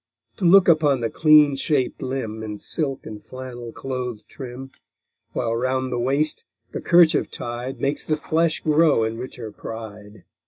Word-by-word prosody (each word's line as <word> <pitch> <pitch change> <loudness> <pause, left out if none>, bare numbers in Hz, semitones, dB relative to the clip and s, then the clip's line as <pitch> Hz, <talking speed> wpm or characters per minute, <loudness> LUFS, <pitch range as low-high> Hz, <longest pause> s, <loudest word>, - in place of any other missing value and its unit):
To 190 - -2
look 190 +2 +7
upon 150 -6 +4
the 115 - -1
clean 150 -3 +5
shap'd 135 -1 0
limb 115 -4 -4
In 105 -1 -5
silk 140 +4 -3
and 105 -1 -9
flannel 125 -2 -8
clothèd 125 -3 -5
trim; 130 0 -9 0.6
While 115 -2 -1
round 130 +2 -1
the 120 - -1
waist 140 +5 0 0.3
the - - -5
kerchief 170 -2 +4
tied 120 +2 -5
Makes 140 +1 -1
the 155 - 0
flesh 160 +2 0
glow 155 -5 +3
in 110 +1 -3
richer 120 -3 -7
pride. 105 -1 -9
130 Hz, 155 wpm, -23 LUFS, 115-150 Hz, 0.6 s, look